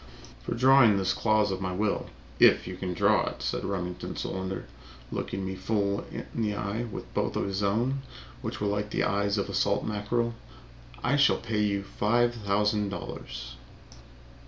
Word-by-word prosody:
"For 60 - -3
drawing 125 -4 +6
this 95 -1 +1
clause 110 -2 +2
of 95 0 -3
my 95 -1 -2
will, 105 +2 0 0.3
if - - +6
you 90 - -5
can 90 -1 -4
draw - - +3
it," - - -5
said - - -1
Remington 90 -2 -3
Solander, 95 0 -3 0.5
looking 95 0 -3
me 95 - -3
full 100 +1 -1
in - - -5
the 105 -3 -1
eye 105 +4 -2
with 110 - -8
both - - 0
his 100 0 -1
own, 120 +7 +1 0.4
which - - -4
were 105 - -1
like 105 +1 -1
the - - 0
eyes 100 +1 +1
of 100 - 0
a - - -6
salt - - +1
mackerel, 115 +3 -1 0.7
"I 140 +4 +3
shall 140 -1 +5
pay 110 -2 -1
you 100 -1 +1
five 120 +4 +2
thousand 105 -1 +1
dollars." 60 -9 -7
100 Hz, 170 wpm, -28 LUFS, 95-110 Hz, 0.7 s, drawing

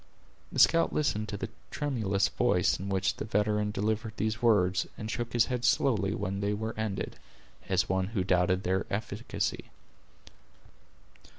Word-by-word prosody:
The - - -6
scout 165 0 +5
listened 110 -8 0
to 100 - -4
the - - -4 0.2
tremulous 110 -10 0
voice - - +2
in 100 +1 -5
which 95 -1 0
the - - -4
veteran 105 0 +1
delivered 110 +2 -1
these 110 +1 -1
words, 95 -6 +3
and 110 -1 -4
shook 120 -1 -3
his 120 -1 +4
head 125 -2 -3
slowly 115 -6 +2
when 100 +1 -3
they 100 +1 0
were 110 +2 -3
ended, 110 -3 -3 0.5
as - - +2
one 95 0 0
who 100 -3 -1
doubted 90 +1 +2
their 95 +1 0
efficacy. 105 +2 -3
105 Hz, 155 wpm, -29 LUFS, 95-115 Hz, 0.5 s, scout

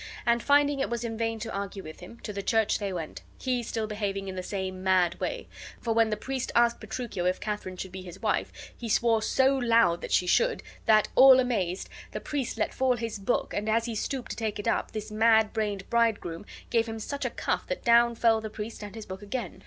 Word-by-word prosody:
And, 235 0 +3
finding 285 +1 +3
it 270 - 0
was 235 0 -2
in 230 -1 -3
vain 225 0 -1
to 225 - -5
argue 200 0 -4
with 155 0 -10
him, 205 +6 -12
to 210 - -6
the 200 - -3
church 220 +1 +2
they 200 -2 -2
went, 165 -4 -5 0.2
he 255 -2 0
still 225 -1 -3
behaving 200 -2 -3
in 190 - -4
the 185 - -3
same 185 0 -4
mad 185 -2 +3
way, - - -3 0.3
for 230 -2 -1
when 225 0 +3
the 210 - -1
priest 265 -1 -3
asked 235 0 +4
Petruchio 220 -4 -4
if 185 - 0
Katharine 210 -3 -4
should 190 0 -6
be 190 0 -7
his 185 0 -10
wife, - - 0 0.2
he 235 - -6
swore 225 0 +3
so 265 +4 +3
loud 230 -9 +3
that - - -6
she 180 - +3
should, 480 - +2 0.2
that, 215 -1 +5
all 260 0 +8
amazed, 200 -8 -1 0.3
the - - -3
priest 280 -5 -3
let - - -1
fall 260 -1 +2
his 225 -2 -4
book, 200 +5 -1
and 210 +1 -2
as 230 +1 +2
he 235 - -3
stooped 250 +3 -3
to - - -4
take 220 -2 -2
it 205 - -5
up - - +1
this 215 0 -6
mad 220 0 +4
brained 205 -3 -2
bridegroom 215 -7 0 0.2
gave 230 -1 +2
him 225 0 -5
such 280 +6 -4
a - - 0
cuff - - -2
that - - -4
down 235 -1 +5
fell 225 -1 +3
the 220 - -5
priest 215 +2 -7
and 205 +1 -8
his 220 -2 -7
book 190 +1 -8
again. 205 -2 -5
220 Hz, 235 wpm, -28 LUFS, 200-235 Hz, 0.3 s, all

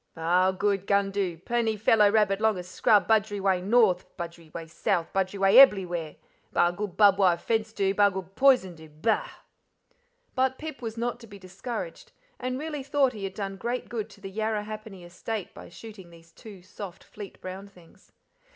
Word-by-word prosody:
"Ba'al 180 +3 +2
good, 200 -1 0
gun 200 -1 +2
do. 190 -4 -2
Plenty 225 +4 -1
fellow 210 0 +4
rabbit 205 -1 +2
longa 215 -5 +1
scrub, 205 +3 +2
budgery 210 -2 +2
way 190 -2 +1
north, 200 -2 +2
budgery 170 -2 -8
way 165 - -7
south; 165 +1 -2
budgery 195 +1 -1
way 195 +2 +3
eblywhere. 175 - +4 0.4
Ba'al 175 0 +2
good 200 -3 -5
barbed 200 -2 +5
wire 180 -3 +4
fence 220 +3 -1
do, 195 -3 0
ba'al 205 0 +4
good 190 0 -7
poison 255 -9 +4
do. 160 -1 -14
Bah!" 220 - -1 1.0
But 260 0 0
Pip 310 -5 -8
was 225 -1 -6
not 240 0 -2
to 230 - -13
be 205 -1 -12
discouraged, 195 - -7 0.3
and 255 0 -3
really 300 0 -5
thought 275 -1 +1
he 205 -3 -6
had 195 - -6
done 195 -2 -5
great 240 +4 -4
good 225 -3 -4
to - - -17
the 195 0 -8
Yarrahappini 215 -3 -4
estate 195 +3 -6
by - - -12
shooting 200 -1 -12
those 165 0 -18
two 200 -2 -13
soft, 185 0 -10
fleet 205 -3 -11
brown 190 +2 -8
things. 180 -4 -21
200 Hz, 180 wpm, -27 LUFS, 185-225 Hz, 1.0 s, barbed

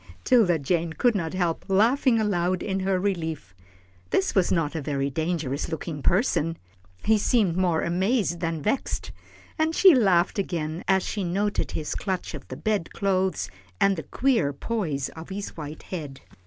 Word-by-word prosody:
'Tilda 215 -9 +4
Jane 165 +3 -1
could 240 +7 +2
not 170 -4 -2
help 175 -3 0
laughing 230 +5 +3
aloud 185 -4 0
in 195 -1 -1
her 190 0 +1
relief. 160 - -3 0.6
This 190 - +1
was 190 -3 +2
not 165 -4 +1
a 160 - -3
very 140 -1 -1
dangerous 155 -2 -2
looking 160 -2 -5
person. 165 - +1 0.5
He 220 -1 +4
seemed 205 -6 +2
more 180 -3 +1
amazed 185 +1 +1
than 165 -3 -2
vexed, 240 +6 -1 0.5
and 320 +1 +1
she 380 -3 +8
laughed 195 -5 +3
again 165 -3 -3
as 190 -1 +3
she 205 - -3
noted 200 +4 -1
his 155 - -3
clutch 190 -4 -3
of 145 -4 -8
the 130 - -7
bed 205 +1 -1
clothes, 185 - 0 0.3
and 195 0 +4
the 160 - -4
queer 230 - +1
poise 150 - -2
of 160 +2 -10
his 200 +1 -5
white 150 -1 -7
head. 150 -7 -6
180 Hz, 165 wpm, -25 LUFS, 160-200 Hz, 0.6 s, she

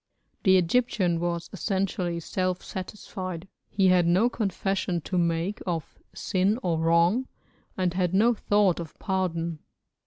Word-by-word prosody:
The 190 -1 +5
Egyptian 185 -2 +1
was 170 0 -2
essentially 185 -2 -1
self 185 +2 -2
satisfied, 185 -2 -6 0.2
he 195 -2 +3
had 180 -2 +4
no 195 +8 +3
confession 195 -4 -1
to 185 - -5
make 170 +4 0
of 165 -3 -4 0.2
sin 195 +3 +1
or 170 -3 0
wrong, 170 +10 +3 0.5
and 180 -2 0
had 180 -2 0
no 220 +6 +4
thought 205 -4 +2
of 165 -2 -8
pardon. 170 -4 -2
185 Hz, 130 wpm, -26 LUFS, 170-195 Hz, 0.5 s, The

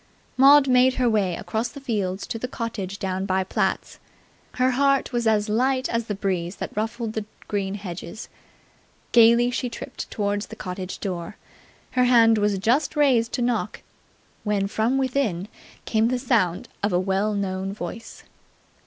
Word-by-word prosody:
Maud 275 +1 +7
made 255 0 +4
her 250 -1 +1
way 200 -6 +1
across 220 +6 -2
the 280 - -10
fields 200 -7 -2
to 225 - -5
the 250 - -3
cottage 220 -6 -5
down 190 0 -3
by 190 0 +1
Platt's. 185 - -2 0.5
Her 255 +1 +2
heart 275 0 +2
was 235 -1 0
as 210 -1 +2
light 255 +4 +1
as 230 0 -1
the 210 - -2
breeze 185 -2 -2
that - - -6
ruffled 225 +1 -3
the 220 - -2 0.2
green 200 -1 -2
hedges. 185 0 -7 0.8
Gaily 235 +1 +6
she 250 0 -2
tripped 235 - -7
towards 205 0 -2
the 220 - -9
cottage 185 -2 -6
door. 180 -1 -4 0.5
Her 250 0 +3
hand 230 -3 +5
was 205 -1 +1
just 240 +12 +1
raised 255 -6 +3
to 245 - 0
knock, 240 0 -2 0.6
when 210 -2 0
from 220 +5 0
within 250 -9 -1 0.4
came 220 0 +2
the 255 +1 0
sound 225 -9 0
of 205 - 0
a 175 - +2
well 195 +3 0
known 190 -1 -2
voice. 200 +3 -8
220 Hz, 160 wpm, -24 LUFS, 195-245 Hz, 0.8 s, Maud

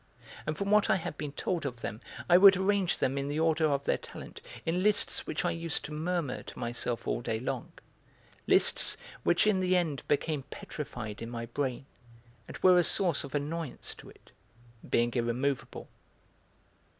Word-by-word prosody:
And 155 0 -2
from 200 0 -2
what 210 0 +4
I - - +5
had 165 -4 -4
been 145 -1 -5
told 170 +3 -2
of 125 -4 -5
them 110 +4 -5 0.3
I 175 - +6
would 195 +1 +9
arrange 190 -1 +1
them 135 +2 0
in 140 - -3
the 145 +2 -2
order 160 0 +3
of 140 -2 0
their - - +1
talent - - -10 0.2
in 170 +3 0
lists 210 +1 +2
which - - -2
I 175 - +2
used 165 -1 -1
to - - -8
murmur 160 -2 -2
to - - -11
myself 120 0 -2
all - - 0
day 110 -1 -2
long: 125 - -4 0.8
lists - - +4 0.2
which 175 - +3
in 210 -3 +3
the 185 0 +3
end 155 -7 -1
became 150 0 0
petrified 120 -8 -7
in 115 - -5
my 115 -1 -5
brain 130 +2 -3 0.6
and - - -8
were 180 -1 +7
a - - +4
source 175 -1 +3
of 140 +1 -7
annoyance 150 +1 -3
to - - -12
it, - - -19 0.6
being 120 0 +2
irremovable. 125 +3 -2
150 Hz, 180 wpm, -30 LUFS, 130-175 Hz, 0.8 s, would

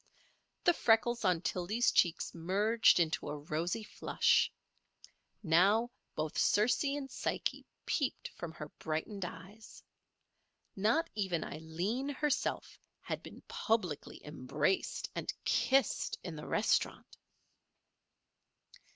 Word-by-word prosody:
The 345 - +5
freckles 240 -3 +3
on 180 -3 +2
Tildy's 215 +8 +1
cheeks 170 -2 +2
merged 200 +6 +3
into 165 -2 0
a 150 - -3
rosy 160 +8 -2
flush. - - +2 0.9
Now 200 +8 +4 0.2
both 155 0 -2
Circe 215 +7 +3
and 280 -1 -1
Psyche - - -3 0.2
peeped 280 -5 -1
from 175 -2 -7
her 150 -2 -8
brightened 170 +5 -3
eyes. 190 +6 -11 0.9
Not 225 - +2
even 190 -5 -1
Aileen 180 - -3
herself 285 0 -1 0.2
had - - -4
been - - -11
publicly 185 -10 -2
embraced 150 +4 -1
and - - -2
kissed 265 -3 +2
in 170 -3 -5
the 150 - -8
restaurant. - - 0
190 Hz, 105 wpm, -33 LUFS, 165-230 Hz, 0.9 s, The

